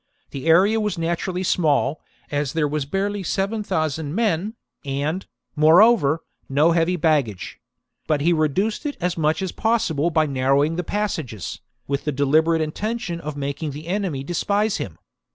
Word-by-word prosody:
The 135 Hz, +2 st, -6 dB
area 195 Hz, +7 st, +5 dB
was 210 Hz, -3 st, -1 dB
naturally 170 Hz, +2 st, -2 dB
small, 150 Hz, -5 st, +1 dB, 0.3 s
as 145 Hz, -2 st, -1 dB
there 160 Hz, -2 st, +1 dB
were 150 Hz, +1 st, -1 dB
barely 200 Hz, +2 st, -1 dB
seven 200 Hz, +4 st, -1 dB
thousand 155 Hz, -4 st, -2 dB
men, 215 Hz, -1 st, 0 dB, 0.3 s
and, 145 Hz, +6 st, -2 dB, 0.3 s
moreover, 160 Hz, 0 st, +5 dB, 0.3 s
no 150 Hz, +5 st, +4 dB
heavy 170 Hz, +2 st, +2 dB
baggage; 150 Hz, -, 0 dB, 0.5 s
but 155 Hz, -2 st, +2 dB
he 170 Hz, +4 st, +3 dB
reduced 170 Hz, +8 st, 0 dB
it 285 Hz, -, -5 dB
as 180 Hz, -1 st, -1 dB
much 160 Hz, +3 st, 0 dB
as 185 Hz, -, -2 dB
possible 175 Hz, -9 st, +1 dB
by 155 Hz, -1 st, +2 dB
narrowing 140 Hz, +3 st, +1 dB
the 180 Hz, -, -2 dB
passages, 160 Hz, -, -3 dB, 0.3 s
with 140 Hz, 0 st, -2 dB
the 150 Hz, -, 0 dB
deliberate 155 Hz, +4 st, +2 dB
intention 175 Hz, +2 st, -3 dB
of 150 Hz, -2 st, -6 dB
making 140 Hz, +1 st, -3 dB
the 150 Hz, +3 st, -8 dB
enemy 180 Hz, -7 st, -2 dB
despise 200 Hz, +6 st, 0 dB
him. 85 Hz, -, -6 dB
160 Hz, 155 wpm, -22 LUFS, 145-190 Hz, 0.5 s, area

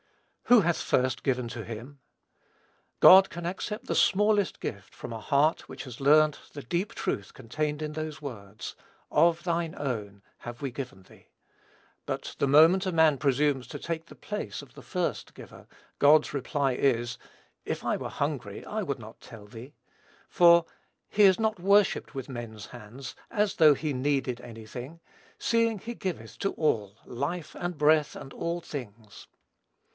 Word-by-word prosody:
"Who 245 Hz, -2 st, +7 dB
hath 175 Hz, -2 st, 0 dB
first 130 Hz, -1 st, 0 dB
given 125 Hz, -3 st, 0 dB
to 115 Hz, -1 st, -6 dB
him?" 120 Hz, +6 st, -9 dB, 1.0 s
God 190 Hz, +1 st, +9 dB
can 175 Hz, 0 st, -7 dB
accept 210 Hz, +7 st, -4 dB
the -, -, -2 dB
smallest 205 Hz, 0 st, +3 dB
gift 100 Hz, -3 st, -6 dB
from 115 Hz, -, -7 dB
a 115 Hz, -, -5 dB
heart 145 Hz, +7 st, +1 dB
which -, -, -7 dB
has 125 Hz, -1 st, -10 dB
learnt 150 Hz, +2 st, +5 dB
the 145 Hz, -, -7 dB
deep 175 Hz, -, -2 dB
truth 100 Hz, -, -3 dB
contained 150 Hz, +5 st, -3 dB
in 150 Hz, 0 st, -4 dB
those 155 Hz, -1 st, -5 dB
words, 105 Hz, -8 st, -8 dB, 0.4 s
"of 165 Hz, +2 st, +3 dB
thine 170 Hz, -2 st, -1 dB
own 105 Hz, -8 st, -4 dB, 0.2 s
have 120 Hz, 0 st, -9 dB
we 135 Hz, -2 st, -3 dB
given 120 Hz, -7 st, -7 dB
thee;" -, -, -20 dB, 0.8 s
but, -, -, -4 dB
the 140 Hz, -, +2 dB
moment 165 Hz, +7 st, +6 dB
a 185 Hz, -, 0 dB
man 160 Hz, -3 st, +4 dB
presumes 140 Hz, -2 st, +1 dB
to -, -, -7 dB
take 165 Hz, -1 st, -4 dB
the -, -, -13 dB
place 210 Hz, -, -5 dB
of -, -, -16 dB
the -, -, -12 dB
"first" -, -, -3 dB
giver, -, -, -13 dB, 0.3 s
God's 150 Hz, +1 st, +5 dB
reply 140 Hz, -1 st, 0 dB
is, 120 Hz, -3 st, 0 dB, 0.5 s
"if -, -, -4 dB
I -, -, +1 dB
were -, -, -5 dB
hungry, -, -, -4 dB
I -, -, -3 dB
would -, -, -3 dB
not -, -, -12 dB
tell 110 Hz, -3 st, -12 dB
thee;" 115 Hz, +7 st, -11 dB, 0.5 s
for 170 Hz, -1 st, +6 dB, 0.4 s
"he 210 Hz, -, +3 dB
is 190 Hz, 0 st, +6 dB
not 220 Hz, -3 st, 0 dB
worshipped 200 Hz, -2 st, +3 dB
with 135 Hz, -3 st, -5 dB
men's 115 Hz, -5 st, -7 dB
hands, 120 Hz, +2 st, -10 dB
as 210 Hz, -2 st, 0 dB
though 155 Hz, -3 st, +6 dB
he 150 Hz, +1 st, -3 dB
needed 130 Hz, -2 st, -1 dB
any 115 Hz, -2 st, -10 dB
thing, 130 Hz, +9 st, -8 dB, 0.4 s
seeing 230 Hz, -1 st, +1 dB
he 235 Hz, +5 st, -6 dB
giveth 160 Hz, -, -5 dB
to 195 Hz, -, 0 dB
all 105 Hz, -9 st, -1 dB
life 150 Hz, +7 st, -4 dB
and 175 Hz, -2 st, -4 dB
breath 150 Hz, 0 st, +3 dB
and 135 Hz, -, -10 dB
all 170 Hz, +1 st, -3 dB
things." 115 Hz, -9 st, -9 dB
145 Hz, 165 wpm, -28 LUFS, 120-170 Hz, 1.0 s, God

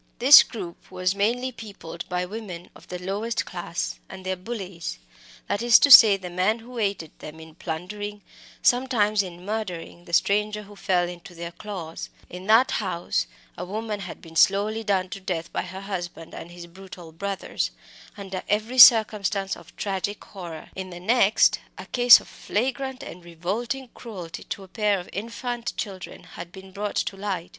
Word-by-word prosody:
This 275 Hz, +4 st, +10 dB
group 185 Hz, -7 st, -8 dB
was 185 Hz, 0 st, 0 dB
mainly 235 Hz, +6 st, 0 dB
peopled 200 Hz, -7 st, -9 dB
by 180 Hz, 0 st, -1 dB
women 185 Hz, -3 st, -8 dB
of -, -, -17 dB
the 180 Hz, -, -5 dB
very 180 Hz, +1 st, -9 dB
lowest 215 Hz, +4 st, -2 dB
class 175 Hz, -1 st, -4 dB
and 190 Hz, -1 st, -10 dB
their 190 Hz, 0 st, -1 dB
"bullies" 185 Hz, -, -6 dB, 0.5 s
that 205 Hz, -, -1 dB
is 240 Hz, -1 st, +7 dB
to 285 Hz, -, +4 dB
say, 215 Hz, -6 st, +11 dB
the 185 Hz, -2 st, -8 dB
men 185 Hz, +5 st, +1 dB
who 235 Hz, +1 st, -9 dB
aided 195 Hz, -7 st, -2 dB
them 155 Hz, +1 st, -10 dB
in 160 Hz, 0 st, -12 dB
plundering, 205 Hz, +6 st, -6 dB, 0.4 s
sometimes 240 Hz, -5 st, +3 dB
in 180 Hz, -1 st, -9 dB
murdering, 185 Hz, -5 st, -5 dB
the -, -, -12 dB
stranger 210 Hz, +3 st, +2 dB
who 205 Hz, 0 st, -14 dB
fell 180 Hz, -3 st, +1 dB
into 175 Hz, 0 st, -10 dB
their 170 Hz, 0 st, -6 dB
claws; 170 Hz, -3 st, -7 dB, 0.2 s
in 180 Hz, +2 st, -8 dB
that 225 Hz, +4 st, +5 dB
house 185 Hz, -5 st, -1 dB, 0.3 s
a -, -, -6 dB
woman 210 Hz, +2 st, -4 dB
had 185 Hz, -3 st, -8 dB
been 165 Hz, -1 st, -13 dB
slowly 205 Hz, +6 st, +3 dB
done 195 Hz, -3 st, +1 dB
to 195 Hz, -, -6 dB
death 175 Hz, -3 st, -4 dB
by -, -, 0 dB
her 185 Hz, +2 st, -8 dB
husband 175 Hz, -4 st, -6 dB
and 170 Hz, -, -8 dB
his 175 Hz, 0 st, -10 dB
brutal 180 Hz, -1 st, -12 dB
brothers 195 Hz, +4 st, -3 dB, 0.5 s
under 195 Hz, -2 st, -5 dB
every 220 Hz, +5 st, 0 dB
circumstance 210 Hz, -4 st, +6 dB
of 170 Hz, -, -16 dB
tragic 200 Hz, +1 st, -3 dB
horror; 170 Hz, -5 st, -9 dB
in 190 Hz, -1 st, -5 dB
the 175 Hz, -1 st, -9 dB
next 220 Hz, +2 st, +4 dB, 0.2 s
a -, -, -8 dB
case 245 Hz, -1 st, +8 dB
of -, -, -15 dB
flagrant 265 Hz, +4 st, -3 dB
and 180 Hz, -, -10 dB
revolting 205 Hz, +10 st, -4 dB
cruelty 185 Hz, -8 st, -8 dB
to 195 Hz, -, -6 dB
a -, -, -13 dB
pair 205 Hz, 0 st, +1 dB
of 175 Hz, -, -9 dB
infant 235 Hz, +3 st, -4 dB
children 190 Hz, -4 st, -6 dB
had 170 Hz, -, -9 dB
just 175 Hz, -, -30 dB
been 190 Hz, 0 st, -12 dB
brought 205 Hz, +1 st, -4 dB
to -, -, -1 dB
light. 195 Hz, -3 st, -4 dB
195 Hz, 180 wpm, -25 LUFS, 180-215 Hz, 0.5 s, say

